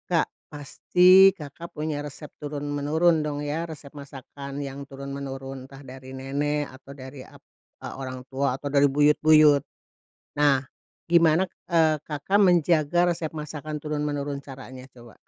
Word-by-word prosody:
Kak, - - +2 0.2
pasti 180 +6 +5
Kakak 155 +3 -9
punya 150 -1 -3
resep 145 +1 -9
turun 145 -1 -5
menurun 155 +3 +2
dong 150 -1 -3
ya, 160 +3 -3
resep 145 -3 -10
masakan 140 0 -9
yang 140 0 -7
turun 140 0 -8
menurun, 135 -1 -7
entah 135 0 -13
dari 130 0 -11
nenek 145 +2 -2
atau 130 +1 -14
dari 130 0 -10
ap - - -15 0.4
e - - -6
orang 130 -1 -6
tua 135 -1 -1
atau 145 - -5
dari 145 0 +5
buyut-buyut. 150 +1 +5 0.8
Nah, 145 -2 +4 0.5
gimana, 170 +1 +4 0.2
eee, 160 -2 +4
Kakak 155 +7 -1
menjaga 175 -3 +3
resep 165 -2 -5
masakan 150 0 -6
turun 150 -1 -3
menurun, 145 -1 -3
caranya 130 -1 -11
coba? 120 -3 -16
145 Hz, 145 wpm, -25 LUFS, 135-155 Hz, 0.8 s, pasti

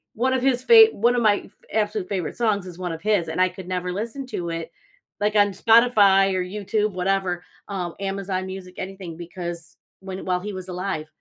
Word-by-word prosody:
one 255 +4 +1
of 260 - +1
his 255 -1 +1
fav 450 -1 +9
one 240 +4 +2
of 245 - +1
my 210 -3 +3
f - - -18 0.2
absolute 210 -3 -1
favorite 185 -5 -3
songs 215 -5 +1
is 180 -1 -10
one 180 -2 -3
of 165 0 -6
his, 205 -5 +2
and 160 - -3
I 185 - +4
could 185 0 -10
never 180 -1 -2
listen 230 +7 -4
to 175 -8 -4
it, 165 0 -5 0.5
like, 210 +1 +1
on 205 -1 +5
Spotify 205 -3 +5
or 185 -1 0
YouTube, 210 +3 -1
whatever, 185 -1 -1 0.3
um, 180 -4 -3
Amazon 195 -1 -3
music, 185 -1 -8
anything 190 -3 -7
because 170 -1 -7 0.2
when 190 0 -7
while 180 -1 +1
he 205 +1 -5
was 185 0 -7
alive, 180 -4 -3
195 Hz, 205 wpm, -23 LUFS, 180-210 Hz, 0.5 s, fav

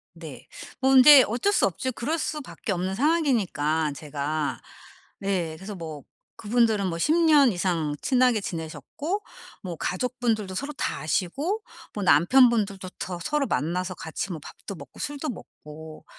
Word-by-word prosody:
네. 160 -5 -11 0.3
뭐 265 0 +2
근데 265 +1 +9
어쩔 245 - 0
수 - - +4
없죠. 195 +8 -2
그럴 300 +7 -2
수밖에 300 -7 -4
없는 185 +1 -2
상황이니까 195 - +1
제가. 150 +1 -3 0.6
네. 180 -5 -2
그래서 190 +6 -8
뭐 160 -5 -8 0.3
그분들은 220 -3 +1
뭐 165 - -3
10 300 - +2
년 305 -6 +5
이상 170 -5 -1
친하게 250 -3 +3
지내셨고 195 - -5 0.4
뭐 180 -3 -5
가족분들도 225 0 -2
서로 280 +9 -4
다 275 - -3
아시고 275 - -1 0.3
뭐 205 - -4
남편분들도 200 - +4
더 180 -2 -5
서로 290 - 0
만나서 180 +4 -1
같이 170 +4 -5
뭐 165 - -5
밥도 200 - -9
먹고 - - -13
술도 290 +1 -4
먹고 155 - -11
195 Hz, 290 characters per minute, -25 LUFS, 165-260 Hz, 0.6 s, 근데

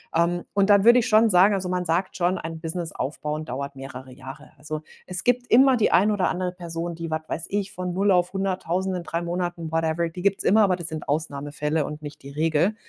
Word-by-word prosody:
Ähm, 170 +1 +1
und 200 0 +2
dann 200 -1 +6
würde 240 +1 +8
ich 235 - -1
schon 220 +1 +5
sagen 190 +2 +5
also, 190 -2 -2
man 180 0 -1
sagt 175 +4 -1
schon, 180 0 +1
ein 160 0 -6
Business 165 0 -3
aufbauen 150 +2 -4
dauert 140 +2 -5
mehrere 130 -1 -9
Jahre. 135 +3 -11
Also, 150 +1 -5 0.2
es 180 -1 0
gibt 245 0 +4
immer 265 +2 +6
die 220 - +2
ein 205 +4 +4
oder 195 -3 +1
andere 180 0 -2
Person, 170 -1 -5
die, 165 -1 -6
was 155 - -1
weiß 165 - -3
ich, 200 -1 -2
von 180 0 -4
0 195 +3 +1
auf 180 -1 +2
100000 190 -1 -1
in 180 - -4
3 170 +1 -3
Monaten, 175 -1 -3
whatever, 165 +1 0
die 180 +2 -8
gibt's 200 -1 +1
immer, 215 +2 +5
aber 185 -3 +2
das 170 -2 -4
sind 155 -1 -6
Ausnahmefälle 150 0 -2
und 150 0 -7
nicht 145 -2 -9
die 140 - -9
Regel, 160 +6 +1
170 Hz, 230 wpm, -24 LUFS, 155-190 Hz, 0.2 s, würde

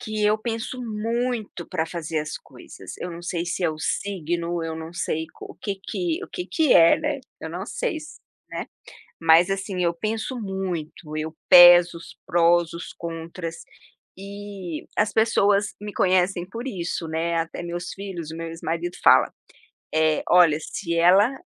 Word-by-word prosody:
que 215 -3 -2
eu 210 +1 +4
penso 230 +2 -4
muito 230 -3 -3
pra 160 - -1
fazer 165 -2 -3
as 150 0 -5
coisas, - - -12
eu 180 - -5
não 170 +1 -8
sei 175 0 -3
se 175 - -3
é - - +3
o 155 - -8
signo, 170 -1 -2
eu 160 0 -4
não 160 +1 -7
sei 160 -3 -2 0.2
o - - -9
que 200 -2 -4
que 345 - -2
o - - -15
que 360 - -5
que 320 -5 +2
é, 165 0 +7
né. 295 -2 -2 0.2
Eu 160 - -5
não 180 +3 -5
sei, - - -2 0.5
né. - - -4 0.5
Mas 165 +2 +5
assim 195 -1 -2
eu 170 -1 +2
penso 220 +7 -3
muito, 175 -6 -5
eu 155 +1 -4
peso 175 -1 +9
os 165 - -13
prós, 170 0 +3
os 170 - -7
contras, 165 0 -6 0.6
e 200 -3 -7
as 210 0 +2
pessoas 205 -2 +2
me 210 0 -6
conhecem 185 -1 +2
por 230 +6 -7
isso, 175 -7 -3
né, 165 +1 -1
até 165 +1 -3
meus 175 0 -5
filhos 185 -5 -6
e 160 - -7
meu 165 0 -5
ex 165 0 -9
marido 170 +2 -3
fala: - - +6 0.6
"Eh, 155 -1 +2
olha 170 -4 +6
se 170 +2 -4
ela 195 +9 +5
175 Hz, 170 wpm, -24 LUFS, 165-205 Hz, 0.6 s, peso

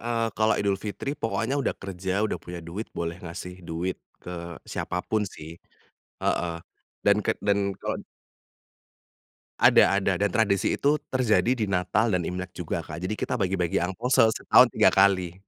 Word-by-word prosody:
eee, 115 0 -1
kalau 110 +1 +3
Idul 100 -1 +1
Fitri 110 +7 -4
pokoknya 135 0 -1
udah - - -1
kerja, 95 +1 -2
udah 110 - -2
punya 90 0 -8
duit 95 +7 -6
boleh 85 +1 -3
ngasih 90 +1 -8
duit 85 +2 -3 0.3
ke 85 -1 -7
siapa 90 0 -4
pun 110 -1 0
sih, 80 0 -11 0.6
heeh 85 -1 0 0.5
dan - - +5
ket - - +1
dan 100 -1 +1
kalo - - -2 1.6
Ada 100 - +6
ada, 95 -2 0
dan 105 - +3
tradisi 100 -1 +1
itu 145 +1 +2
terjadi 125 0 +2
di 115 - 0
Natal 100 +3 +1
dan 90 - +2
Imlek 90 0 -5
juga 85 -2 -4
Kak, 80 +2 -7
jadi 90 +4 -2
kita 125 - -2
bagi-bagi 90 -3 0
angpao 100 +8 -2
se 115 - +6
setahun 110 - +5
3 - - +4
kali. 95 -3 +3
95 Hz, 165 wpm, -26 LUFS, 90-110 Hz, 1.6 s, Ada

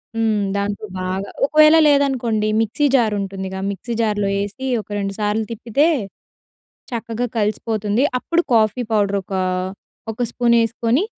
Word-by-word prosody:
హ్మ్. 220 -2 +1 0.2
దాంతో 200 +1 -2 0.2
బాగా 190 +2 -3 0.2
ఒకవేళ 305 +2 +6
లేదనుకోండి 250 -7 +1
మిక్సీ 225 +7 0
జార్ 225 -4 +3
ఉంటుందిగా 190 -1 -5
మిక్సీ 215 +4 -5
జార్‍లో 205 -2 0
ఏసి 205 +7 -5 0.2
ఒక - - -22
2 195 -1 -2
సార్లు 210 +1 0
తిప్పితే 230 +6 +1 1.1
చక్కగా 230 +1 -3
కలిసిపోతుంది. 215 +2 0
అప్పుడు 335 +6 +1
కాఫీ 220 +2 +3
పౌడర్ 200 -2 +2
ఒక, 195 - -9 0.8
ఒక 245 +3 -3
స్పూన్ 235 -1 +2
ఏసుకొని 235 - 0
220 Hz, 130 wpm, -20 LUFS, 205-245 Hz, 1.1 s, ఒకవేళ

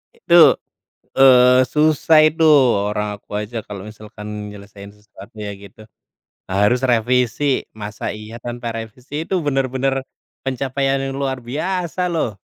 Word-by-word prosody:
Itu, 460 - +1 0.8
eee, 125 -1 +6
susah 155 +1 +4
itu. 160 +1 -1 0.4
Orang 105 0 -2
aku - - -51
aja 105 +3 -6
kalau 100 -2 -7
misalkan 105 0 -11 0.2
nyelesaiin 100 0 -12
sesuatunya 105 0 -10
gitu, 100 +2 -15 0.7
harus 105 +6 +2
revisi, 125 +3 +1
masa 105 0 -8
iya 105 +2 -9
tanpa 120 0 -6
revisi. 115 +5 -10
Itu 190 - -3
benar-benar 135 -1 0 0.5
pencapaian 135 +1 -1
yang 135 0 -4
luar 135 -1 -2
biasa 180 +7 -2
loh. 115 -11 -2
125 Hz, 120 wpm, -19 LUFS, 105-135 Hz, 0.8 s, eee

